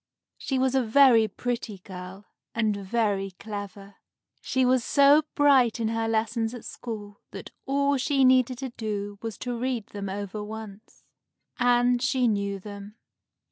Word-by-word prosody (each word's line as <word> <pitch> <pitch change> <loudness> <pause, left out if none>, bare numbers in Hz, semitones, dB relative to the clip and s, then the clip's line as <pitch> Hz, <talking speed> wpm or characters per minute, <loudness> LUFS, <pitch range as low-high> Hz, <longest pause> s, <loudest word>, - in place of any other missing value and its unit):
She 265 - -2
was 260 0 +1
a 265 - +3
very 235 -1 +5
pretty 235 0 -4
girl, 185 +1 -10 0.3
and 220 -2 +1
very 200 -1 -1
clever. 200 -1 -8 0.4
She 260 -1 +1
was 255 -1 +3
so 285 +3 +5
bright 265 -6 +4
in 225 -1 0
her 225 0 -1
lessons 225 +1 -1
at 240 - -10
school 205 -3 -8
that - - -9 0.2
all 280 +1 +2
she 270 +1 +1
needed 255 -1 +4
to 265 +1 -5
do 205 -3 -5
was 225 -3 -5
to 245 -1 -4
read 240 -2 -2
them 200 -1 -6
over 205 +1 -5
once, 215 -1 -10 0.6
and 245 0 +3
she 255 -1 +2
knew 200 -2 -1
them. 200 +1 -10
225 Hz, 150 wpm, -26 LUFS, 205-255 Hz, 0.6 s, very